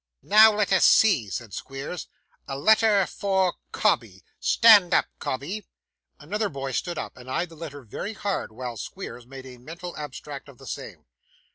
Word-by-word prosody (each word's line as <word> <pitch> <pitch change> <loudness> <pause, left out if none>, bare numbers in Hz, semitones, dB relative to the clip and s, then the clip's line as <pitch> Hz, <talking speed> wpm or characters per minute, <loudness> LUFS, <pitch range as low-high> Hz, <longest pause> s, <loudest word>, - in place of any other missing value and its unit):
'Now 215 +1 +7
let 210 -2 0
us 190 - +4
see,' 140 - +5
said 105 +1 -6
Squeers. 135 - -6 0.4
'A 135 - -4
letter 215 +4 +4
for 190 -2 0 0.2
Cobbey. - - 0 0.2
Stand 210 -6 +6
up, - - +4
Cobbey.' 175 +11 -4 0.5
Another 205 +8 -2
boy 135 -1 -5
stood 175 +5 -3
up, - - -5
and 130 0 -12
eyed 170 +6 -1
the 165 - -13
letter 150 -3 -8
very 160 - -6
hard 200 - -3
while 120 0 -6
Squeers 120 - -8
made 135 0 -10
a 125 -2 -11
mental 170 +6 -8
abstract 145 -1 -8
of 135 - -15
the - - -14
same. - - -8
165 Hz, 165 wpm, -25 LUFS, 135-200 Hz, 0.5 s, Now